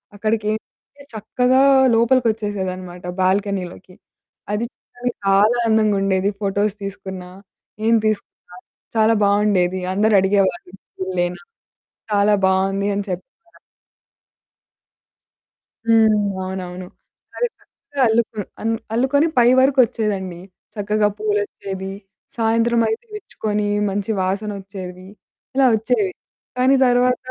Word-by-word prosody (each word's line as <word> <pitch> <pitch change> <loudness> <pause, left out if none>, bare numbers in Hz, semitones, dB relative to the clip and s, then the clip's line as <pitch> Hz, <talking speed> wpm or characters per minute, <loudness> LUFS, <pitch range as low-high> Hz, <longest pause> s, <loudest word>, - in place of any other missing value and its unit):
అక్కడికైతే 215 +6 -4
చక్కగా 250 +5 +1 0.3
లోపలికొచ్చేసేదనమాట 205 -7 0 0.2
బాల్కనీలోకి. 185 -1 -1 0.6
అది, 220 +3 -1 0.3
అది 245 0 -1
చాలా 200 +4 +4
అందంగుండేది, 200 -3 +2
ఫోటోస్ 200 +1 0
తీసుకున్న, 190 -1 -6 0.6
ఏం 230 - +4
తీసుకున్నా 205 -4 -4 0.4
చాలా 220 +1 +4
బావుండేది. 200 -3 +2
అందరూ 215 +2 +2
అడిగేవాళ్ళు 190 -2 0 0.3
పువులేన 180 -1 -2 0.7
చాలా 205 0 +3
బావుంది 195 +1 +1
అని 200 0 -2
చెప్తారు. 265 - -9 2.4
హ్మ్. 220 -1 +5 0.3
అవునవును. 185 -1 -6 0.5
అది 485 - +1
చక్కగా 285 -1 -10
అల్లుకు 220 -1 0 0.2
అన్ 225 +1 0 0.2
అల్లుకొని 270 +5 +2
పై 235 - +6
వరకొచ్చేదండి. 215 -9 +1 0.3
చక్కగా 210 0 +1
పూలొచ్చేది, 200 -2 -3 0.5
సాయంత్రమైతే 230 - +1
విచ్చుకొని 210 - -3 0.2
మంచి 200 +2 -3
వాసనొచ్చేవి, 190 -1 -4 0.5
ఇలా 270 0 +4
వచ్చేవి. 220 -4 0 0.4
కానీ, 255 +2 +4
తర్వాత 250 +1 +3
205 Hz, 90 wpm, -20 LUFS, 190-225 Hz, 2.4 s, పై